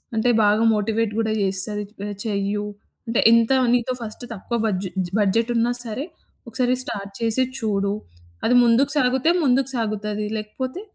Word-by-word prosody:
అంటే 225 Hz, +3 st, +1 dB
బాగా 210 Hz, +2 st, +3 dB
మోటివేట్ 215 Hz, +1 st, -1 dB
కూడా 220 Hz, -1 st, 0 dB
చేస్తది. 195 Hz, +2 st, +2 dB, 0.4 s
చెయ్యు, 205 Hz, 0 st, -2 dB, 0.4 s
అంటే, 230 Hz, -, 0 dB
"ఎంత 230 Hz, +2 st, +4 dB, 0.2 s
నీతో 245 Hz, +1 st, +1 dB
ఫస్ట్ 220 Hz, +2 st, -5 dB
తక్కువ 230 Hz, +3 st, -4 dB
బడ్జు 190 Hz, -3 st, -1 dB, 0.3 s
బడ్జెట్ 225 Hz, +4 st, +1 dB
ఉన్నా 235 Hz, +1 st, +2 dB
సరే, 230 Hz, +6 st, -4 dB, 0.4 s
ఒకసారి 245 Hz, +2 st, 0 dB
స్టార్ట్ 200 Hz, -5 st, -6 dB
చేసి 230 Hz, +3 st, +3 dB, 0.2 s
చూడు. 200 Hz, -2 st, -1 dB, 0.5 s
అది 245 Hz, -, +3 dB
ముందుకు 240 Hz, +4 st, +4 dB
సాగితే 265 Hz, +4 st, +2 dB
ముందుకు 265 Hz, 0 st, +2 dB
సాగుతది. 210 Hz, -2 st, -2 dB
లేకపోతే 260 Hz, -, -5 dB
225 Hz, 135 wpm, -22 LUFS, 210-245 Hz, 0.5 s, ఎంత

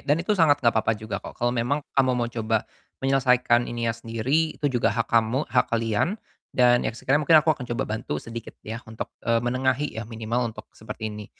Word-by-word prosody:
dan 145 Hz, +2 st, +1 dB
itu 180 Hz, +5 st, 0 dB
sangat 165 Hz, -8 st, +4 dB
gak 115 Hz, -, +5 dB
apa-apa 110 Hz, 0 st, +1 dB
juga 110 Hz, 0 st, -5 dB
kok, -, -, -10 dB
kalau 120 Hz, 0 st, 0 dB
memang 125 Hz, +5 st, -1 dB
kamu 135 Hz, -1 st, +3 dB
mau 120 Hz, -, +1 dB
coba 110 Hz, -2 st, 0 dB, 0.4 s
menyelesaikan 125 Hz, -3 st, +3 dB
ininya 115 Hz, -1 st, -1 dB
sendiri, 115 Hz, +8 st, -1 dB
itu 150 Hz, -, -1 dB
juga 120 Hz, -, +2 dB
hak 115 Hz, +2 st, 0 dB
kamu, 115 Hz, +5 st, +2 dB
hak 125 Hz, -, +3 dB
kalian, 115 Hz, -, 0 dB, 0.4 s
dan 120 Hz, -1 st, +5 dB
ya -, -, -1 dB
sekiranya 140 Hz, +4 st, +1 dB
mungkin 160 Hz, -, +8 dB
aku 160 Hz, -, +4 dB
akan 125 Hz, -5 st, -8 dB
coba 135 Hz, -, 0 dB
bantu 110 Hz, -8 st, -3 dB
sedikit 115 Hz, +8 st, -8 dB
ya 110 Hz, +2 st, -5 dB
untuk, 110 Hz, 0 st, -6 dB
eee, 115 Hz, -1 st, +1 dB
menengahi 130 Hz, +3 st, 0 dB
ya 110 Hz, -, -8 dB
minimal 115 Hz, +1 st, -2 dB
untuk 110 Hz, -1 st, -10 dB
seperti 110 Hz, 0 st, -6 dB
ini, 105 Hz, 0 st, -8 dB
120 Hz, 205 wpm, -25 LUFS, 115-135 Hz, 0.4 s, mungkin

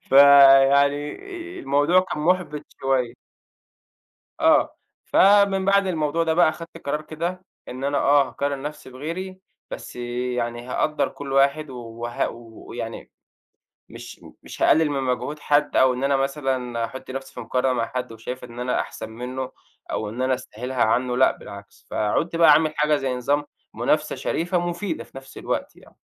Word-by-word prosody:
فيعني 140 Hz, +1 st, +6 dB, 0.5 s
آآ، -, -, -6 dB
الموضوع 145 Hz, +6 st, +3 dB
كان 185 Hz, -, -5 dB
مُحبِط 175 Hz, -3 st, 0 dB, 0.2 s
شوية. 130 Hz, -3 st, 0 dB, 1.3 s
آه. -, -, +3 dB, 0.3 s
فمن 200 Hz, -1 st, +4 dB
بعد 200 Hz, 0 st, +3 dB
الموضوع 165 Hz, -1 st, 0 dB
ده 160 Hz, -1 st, +1 dB
بقى 175 Hz, -1 st, +5 dB
أخدت 165 Hz, +1 st, -8 dB
قرار 150 Hz, +2 st, -1 dB
كده 170 Hz, +4 st, -5 dB, 0.2 s
إن 130 Hz, +2 st, -7 dB
أنا 140 Hz, +1 st, 0 dB
آه، 140 Hz, -1 st, +4 dB
هاقارن 140 Hz, +1 st, -3 dB
نَفْسي 150 Hz, -1 st, -7 dB
بغيري 170 Hz, +8 st, -6 dB, 0.3 s
بس -, -, -8 dB
يعني 120 Hz, -1 st, -3 dB
هاقدَّر 150 Hz, +4 st, 0 dB
كُلّ 140 Hz, -1 st, -8 dB
واحد 140 Hz, +2 st, +2 dB
و 130 Hz, -, -9 dB
وه 120 Hz, 0 st, -4 dB
و 115 Hz, -1 st, -13 dB
ويعني -, -, -7 dB, 0.8 s
مش -, -, -11 dB, 0.2 s
مش -, -, -10 dB
هاقلِّل 160 Hz, -1 st, +4 dB
من 140 Hz, -2 st, -1 dB
مجهود 130 Hz, +4 st, -2 dB
حد 145 Hz, 0 st, +1 dB
أو 130 Hz, -1 st, +5 dB
إن 125 Hz, +1 st, -4 dB
أنا 140 Hz, 0 st, +2 dB
مثلًا 135 Hz, -4 st, -1 dB
أحُطّ 130 Hz, +4 st, -10 dB
نَفْسي 135 Hz, 0 st, -7 dB
في -, -, -9 dB
مقارنة 125 Hz, +2 st, 0 dB
مع 115 Hz, -2 st, 0 dB
حد، 125 Hz, 0 st, -5 dB
وشايف 120 Hz, +3 st, -7 dB
إن 120 Hz, -1 st, -10 dB
أنا 125 Hz, 0 st, 0 dB
أحسن 110 Hz, -, -6 dB
منّه 125 Hz, +3 st, -6 dB, 0.4 s
أو 105 Hz, -, -2 dB
إن 115 Hz, +4 st, -5 dB
أنا 130 Hz, 0 st, +2 dB
أستاهلها 125 Hz, 0 st, -3 dB
عنّه 125 Hz, +2 st, +1 dB
لأ، 130 Hz, -, +5 dB
بالعكس، 100 Hz, 0 st, -13 dB
فعُنت 130 Hz, +11 st, -1 dB
بقى 165 Hz, -2 st, +7 dB
عامل 155 Hz, +1 st, +4 dB
حاجة 150 Hz, 0 st, +3 dB
زي 135 Hz, -3 st, -2 dB
نظام 145 Hz, +4 st, 0 dB, 0.3 s
منافسة -, -, 0 dB
شريفة 175 Hz, +2 st, -1 dB
مفيدة 175 Hz, +3 st, -4 dB
في -, -, -14 dB
نَفْس 135 Hz, 0 st, -12 dB
الوقت -, -, -3 dB
يعني. -, -, -20 dB
135 Hz, 165 wpm, -23 LUFS, 125-155 Hz, 1.3 s, بقى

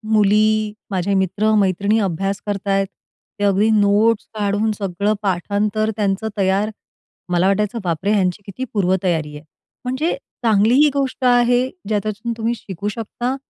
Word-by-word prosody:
मुली 215 Hz, +1 st, +3 dB, 0.2 s
माझे 190 Hz, +1 st, 0 dB
मित्र-मैत्रिणी 200 Hz, +1 st, +2 dB
अभ्यास 195 Hz, +1 st, -1 dB
करतायत, 195 Hz, -1 st, 0 dB, 0.5 s
ते -, -, -1 dB
अगदी 200 Hz, +2 st, +3 dB
नोट्स 205 Hz, +2 st, +3 dB
काढून 210 Hz, +1 st, 0 dB
सगळं 200 Hz, 0 st, -1 dB
पाठांतर 205 Hz, +3 st, 0 dB
त्यांचं 205 Hz, +1 st, 0 dB
तयार. 195 Hz, +2 st, +1 dB, 0.6 s
मला 180 Hz, +1 st, +2 dB
वाटायचं 210 Hz, +3 st, 0 dB
बापरे! 175 Hz, +3 st, -1 dB
ह्यांची 190 Hz, -1 st, +1 dB
किती 205 Hz, +6 st, -6 dB
पूर्वतयारी 180 Hz, -6 st, 0 dB
आहे. 150 Hz, -, -13 dB, 0.4 s
म्हणजे 260 Hz, +7 st, -1 dB, 0.3 s
चांगली 220 Hz, +1 st, +4 dB
ही 300 Hz, -, +5 dB
गोष्ट 270 Hz, -2 st, -1 dB
आहे, 245 Hz, 0 st, +4 dB, 0.2 s
ज्याच्यातून 215 Hz, +2 st, -2 dB
तुम्ही 230 Hz, +1 st, 0 dB
शिकू 200 Hz, -2 st, -7 dB
शकता 235 Hz, +4 st, -3 dB
205 Hz, 130 wpm, -20 LUFS, 195-220 Hz, 0.6 s, ही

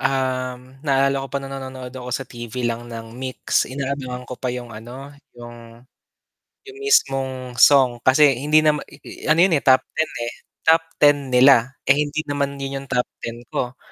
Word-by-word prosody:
um, 130 Hz, -1 st, -2 dB
naalala 135 Hz, -1 st, +1 dB
ko 135 Hz, -, -6 dB
pa -, -, -4 dB
nung 135 Hz, 0 st, -6 dB
nanonood 130 Hz, -1 st, -7 dB
ako 125 Hz, -1 st, -8 dB
sa 130 Hz, +2 st, -3 dB
TV 120 Hz, -1 st, -6 dB
lang 120 Hz, 0 st, -3 dB
ng 115 Hz, -1 st, -8 dB
MYX, 130 Hz, +1 st, -1 dB
inaabangan 130 Hz, -2 st, -4 dB
ko 125 Hz, -, -7 dB
pa 130 Hz, -, -2 dB
'yung 125 Hz, -1 st, -5 dB
ano, 125 Hz, +6 st, -10 dB, 0.2 s
'yung 120 Hz, 0 st, -12 dB, 0.8 s
'yung 405 Hz, 0 st, -12 dB
mismong 135 Hz, -, +1 dB
song, 125 Hz, -2 st, +5 dB
kasi 135 Hz, +3 st, +5 dB
hindi 155 Hz, +2 st, +3 dB
naman 150 Hz, -1 st, +3 dB, 0.5 s
ano 155 Hz, -, +4 dB
'yun 180 Hz, 0 st, +5 dB
eh, 145 Hz, -, +2 dB
top 130 Hz, -1 st, +5 dB
ten 160 Hz, -, 0 dB, 0.6 s
top 165 Hz, 0 st, +5 dB
10 145 Hz, -1 st, +5 dB
nila 125 Hz, -1 st, +5 dB, 0.2 s
eh, 135 Hz, -, +6 dB
hindi 150 Hz, +1 st, -2 dB
naman 140 Hz, -1 st, -2 dB
'yun 135 Hz, 0 st, -4 dB
'yung 140 Hz, -, -13 dB
top 125 Hz, -1 st, +1 dB, 0.2 s
10 115 Hz, 0 st, -5 dB, 0.2 s
ko. 125 Hz, 0 st, -3 dB
130 Hz, 170 wpm, -21 LUFS, 125-140 Hz, 0.8 s, eh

